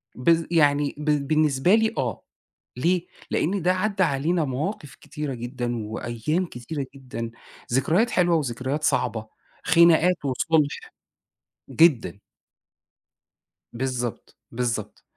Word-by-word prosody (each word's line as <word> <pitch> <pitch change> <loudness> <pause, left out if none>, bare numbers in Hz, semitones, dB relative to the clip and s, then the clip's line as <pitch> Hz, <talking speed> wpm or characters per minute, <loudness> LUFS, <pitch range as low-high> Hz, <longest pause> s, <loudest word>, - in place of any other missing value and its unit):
بالض 165 +5 +2
يعني 145 -3 +3
ب 150 -2 0
بالنسبة 155 +3 +3
لي 220 0 +2
آه. 125 -6 -2 0.6
ليه؟ 175 +6 +1 0.2
لأن 190 +3 0
ده 180 +2 +3
عدّى 195 0 0
علينا 155 +3 +1
مواقف 145 +2 -4
كتيرة 150 -3 -6
جدًا، 120 -2 -4
وأيام 120 +11 -2
كتيرة 135 +1 -6
جدًا، 125 -4 -6 0.4
ذكريات 165 - +2
حلوة 175 -2 +3
وذكريات 135 +1 -2
صعبة، 110 -1 0 0.4
خناقات 170 0 +4
وصلح، 150 +3 0 0.8
جدًا. 145 -11 +3 1.5
بالضبط، 125 -2 -4
بالضبط. 115 -3 -3
145 Hz, 105 wpm, -24 LUFS, 125-170 Hz, 1.5 s, خناقات